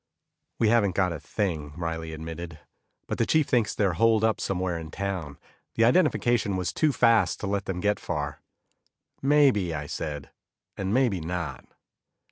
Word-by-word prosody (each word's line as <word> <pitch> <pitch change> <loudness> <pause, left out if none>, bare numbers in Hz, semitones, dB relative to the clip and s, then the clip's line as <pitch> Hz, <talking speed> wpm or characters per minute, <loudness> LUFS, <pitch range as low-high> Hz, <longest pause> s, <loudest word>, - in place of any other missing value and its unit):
"We 110 - +3
haven't 105 -5 +3
got 90 -3 +2
a 80 - -6
thing," 80 -8 -3
Riley 80 -1 -4
admitted, 80 +1 -7 0.5
"but - - -3
the 115 - +3
chief 155 -2 +3
thinks 120 -4 +1
they're 100 -4 +1
holed 110 +4 +3
up 110 -1 +2
somewhere 90 -3 -1
in 80 -1 -8
town. 90 -7 -4 0.4
The 115 - +3
identification 120 - +2
was 90 -2 -2
too 155 -2 +2
fast 115 -8 +3
to - - -3
let 100 0 -1
them 90 -2 -3
get 105 +3 +1
far." 75 -3 -4 0.8
"Maybe," 135 - +3
I 75 -1 -4
said, 75 -1 -5 0.4
"and 95 0 -3
maybe 120 -5 +2
not." 85 0 -4
95 Hz, 160 wpm, -26 LUFS, 80-115 Hz, 0.8 s, We